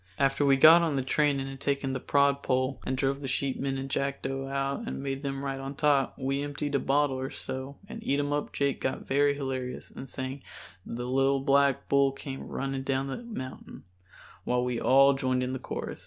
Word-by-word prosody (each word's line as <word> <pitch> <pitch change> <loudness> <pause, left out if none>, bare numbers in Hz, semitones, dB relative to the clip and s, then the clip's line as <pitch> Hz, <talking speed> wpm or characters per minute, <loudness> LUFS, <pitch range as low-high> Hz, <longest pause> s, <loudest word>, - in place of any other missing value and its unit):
After 135 +1 +2
we 135 -1 +5
got 160 +5 +9
on 160 -4 0
the 135 - 0
train 145 +1 +2
and 135 - -3
had 135 0 -8
taken 140 -1 -1
the 130 - -2
prod 140 +1 +2
pole, 130 0 0
and 130 - -1
drove 135 +1 0
the 135 - -4
sheepmen 135 +1 -1
and 135 0 -4
Jackdo 135 0 -2
out 140 +10 -2
and 135 - -4
made 135 0 -3
them 135 -1 -3
ride 135 -1 -3
on 135 +1 -6
top, 140 -2 +2
we 135 +1 -1
emptied 145 0 -3
a 140 - +3
bottle 140 -1 +1
or 130 +1 -3
so 130 +2 -6
and 225 +1 -8
Eatumup 145 -4 -1
Jake 140 -1 -1
got 130 - -2
very 140 +1 +3
hilarious 130 -2 -4
and 135 - -9
sang 130 +2 -5 0.5
"The 120 +1 -4
Little 135 +1 +2
Black 140 -1 +3
Bull 140 -1 +4
Came 135 -1 -7
Running 135 -1 -3
Down 135 0 -1
the 135 - -3
Mountain," 215 - -8 0.6
while 125 0 +1
we 125 -2 -2
all 135 +1 +6
joined 130 -1 0
in 125 - -2
the 130 - -3
chorus. - - -5
135 Hz, 205 wpm, -28 LUFS, 135-140 Hz, 0.6 s, got